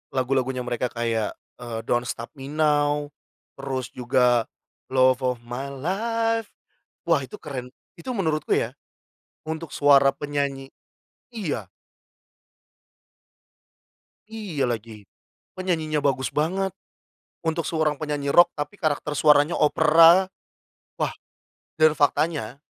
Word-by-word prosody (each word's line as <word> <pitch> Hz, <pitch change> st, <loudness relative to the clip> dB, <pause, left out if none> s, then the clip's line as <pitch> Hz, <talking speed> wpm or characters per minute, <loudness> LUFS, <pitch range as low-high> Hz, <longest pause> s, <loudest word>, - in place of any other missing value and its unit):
lagu-lagunya 130 Hz, -1 st, 0 dB
mereka 125 Hz, 0 st, -1 dB
kayak, 115 Hz, -3 st, -2 dB, 0.2 s
eee, 120 Hz, -2 st, -5 dB
Don't 120 Hz, +1 st, 0 dB
Stop 115 Hz, -, -5 dB
Me 135 Hz, 0 st, -9 dB
Now, 150 Hz, -1 st, +1 dB, 0.5 s
terus 130 Hz, -2 st, -4 dB
juga 125 Hz, -2 st, +2 dB, 0.4 s
love 130 Hz, 0 st, +4 dB
of 125 Hz, -1 st, 0 dB
my 125 Hz, +3 st, -5 dB
life, 225 Hz, -, -1 dB, 0.6 s
wah, 160 Hz, -4 st, +3 dB
itu 130 Hz, -, -9 dB
keren. 125 Hz, -4 st, -6 dB, 0.3 s
Itu 170 Hz, -, -9 dB
menurutku 160 Hz, -6 st, -1 dB
ya, -, -, -2 dB, 0.7 s
untuk 160 Hz, +1 st, -5 dB
suara 140 Hz, -1 st, +5 dB
penyanyi 140 Hz, -2 st, -3 dB, 0.6 s
iya. 150 Hz, -, -3 dB, 2.6 s
Iya 195 Hz, -, -3 dB
lagi, 110 Hz, -3 st, -5 dB, 0.5 s
penyanyinya 160 Hz, -5 st, -1 dB
bagus 130 Hz, -2 st, +1 dB
banget. 185 Hz, +5 st, 0 dB, 0.7 s
Untuk 165 Hz, 0 st, -1 dB
seorang 155 Hz, -2 st, 0 dB
penyanyi 145 Hz, -2 st, -2 dB
rock, 175 Hz, +3 st, +6 dB
tapi 145 Hz, +7 st, -5 dB
karakter 150 Hz, -3 st, -1 dB
suaranya 150 Hz, +2 st, +4 dB
opera. 165 Hz, +4 st, +6 dB, 0.7 s
Wah, -, -, 0 dB, 0.7 s
dan 155 Hz, 0 st, +6 dB
faktanya 145 Hz, -4 st, 0 dB
145 Hz, 105 wpm, -24 LUFS, 130-160 Hz, 2.6 s, rock